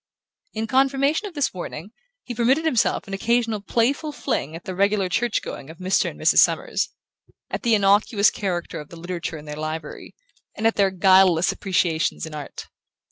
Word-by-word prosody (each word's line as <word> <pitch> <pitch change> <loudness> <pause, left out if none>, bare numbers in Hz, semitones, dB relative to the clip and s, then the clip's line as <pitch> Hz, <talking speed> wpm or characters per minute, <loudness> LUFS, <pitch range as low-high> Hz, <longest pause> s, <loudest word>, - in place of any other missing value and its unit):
In 220 +1 -2
confirmation 275 - +1
of 365 - -12
this 290 -2 0
warning 180 +1 -7 0.3
he 245 - -6
permitted 255 +7 +2
himself 245 -6 +1
an 195 - -7
occasional 230 +1 0
playful 265 +9 0
fling 165 - -3
at 165 - -9
the 185 - -4
regular 200 +1 +1
church 235 +4 0
going 140 - -8
of 160 - -11
Mr. 185 +2 +1
and - - -12
Mrs. - - +4
Summers, - - +2 0.6
at - - -3
the 235 -4 +3
innocuous 205 +1 +3
character 180 -4 -3
of 150 - -10
the 170 - -11
literature 170 -1 -5
in 150 - -11
their 150 0 -6
library, 155 +1 -6 0.4
and 220 - -4
at 225 - +4
their 200 -1 +2
guileless 185 -2 +4
appreciations 175 -6 0
in 160 - -9
art. 150 -2 -7
195 Hz, 180 wpm, -23 LUFS, 170-235 Hz, 0.6 s, Mrs